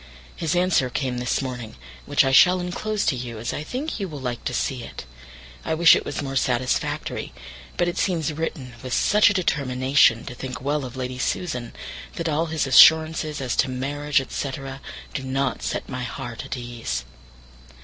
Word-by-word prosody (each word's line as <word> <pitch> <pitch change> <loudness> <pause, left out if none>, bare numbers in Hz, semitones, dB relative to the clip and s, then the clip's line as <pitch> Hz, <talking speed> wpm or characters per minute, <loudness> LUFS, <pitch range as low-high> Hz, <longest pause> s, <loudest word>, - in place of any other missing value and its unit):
His 165 +1 -1
answer 175 -7 +2
came 125 -1 -2
this 125 +2 0
morning, 125 -4 -6 0.3
which - - +4
I 135 - +2
shall 180 +7 +6
enclose 200 +4 -2
to 140 - +2
you, 120 -2 -6
as 115 +2 -3
I - - -3
think 260 - -4
you 195 - -2
will 150 -4 -7
like 125 -2 -4
to - - -1
see 130 0 -1
it. - - -9 0.6
I - - -1
wish 165 0 +7
it - - -1
was - - -4
more 135 -1 -4
satisfactory; 125 - -1 0.4
but 175 - +2
it 175 - -2
seems 165 -5 0
written 145 -5 -4
with 130 -2 -5
such 210 +13 +5
a - - +1
determination 130 - +3
to 130 - -6
think 125 0 -6
well 145 +1 -1
of 125 0 -8
Lady 125 0 -4
Susan, 125 -5 -2 0.4
that 165 - -4 0.2
his 160 -2 0
assurances 155 +1 +6
as 125 -2 -1
to - - +3
marriage, 140 +2 0
&c., 140 - -3 0.6
do - - -3
not 130 -1 -1
set - - -3
my 130 -1 -5
heart 120 -1 -6
at - - -4
ease. 115 - -4
135 Hz, 180 wpm, -24 LUFS, 125-160 Hz, 0.6 s, wish